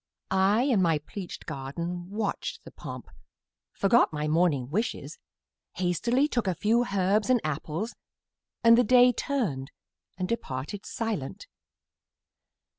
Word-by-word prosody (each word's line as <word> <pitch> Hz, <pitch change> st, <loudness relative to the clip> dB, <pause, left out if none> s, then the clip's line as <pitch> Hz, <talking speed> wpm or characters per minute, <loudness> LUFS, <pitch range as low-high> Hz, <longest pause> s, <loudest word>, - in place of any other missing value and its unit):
I, 195 Hz, +5 st, +3 dB
in 250 Hz, -8 st, +3 dB
my 165 Hz, -3 st, +3 dB
pleached 175 Hz, +5 st, -8 dB
garden, 170 Hz, +6 st, -5 dB
watched 205 Hz, 0 st, -3 dB
the -, -, -12 dB
pomp, -, -, -8 dB, 0.6 s
Forgot 235 Hz, +5 st, +3 dB
my 150 Hz, -1 st, -2 dB
morning 150 Hz, -5 st, +1 dB
wishes, 225 Hz, -, -2 dB, 0.6 s
hastily 235 Hz, -, +1 dB
Took 240 Hz, -8 st, -1 dB
a 185 Hz, -, +1 dB
few 230 Hz, +6 st, +2 dB
herbs 200 Hz, +4 st, +2 dB
and 255 Hz, -1 st, +5 dB
apples, 155 Hz, +8 st, -3 dB, 0.7 s
and 230 Hz, 0 st, +7 dB
the -, -, +5 dB
Day 250 Hz, +2 st, +6 dB
Turned 205 Hz, -, -2 dB, 0.5 s
and 185 Hz, 0 st, -2 dB
departed 185 Hz, -, -4 dB
silent. 220 Hz, -, -4 dB
195 Hz, 120 wpm, -28 LUFS, 160-230 Hz, 0.7 s, and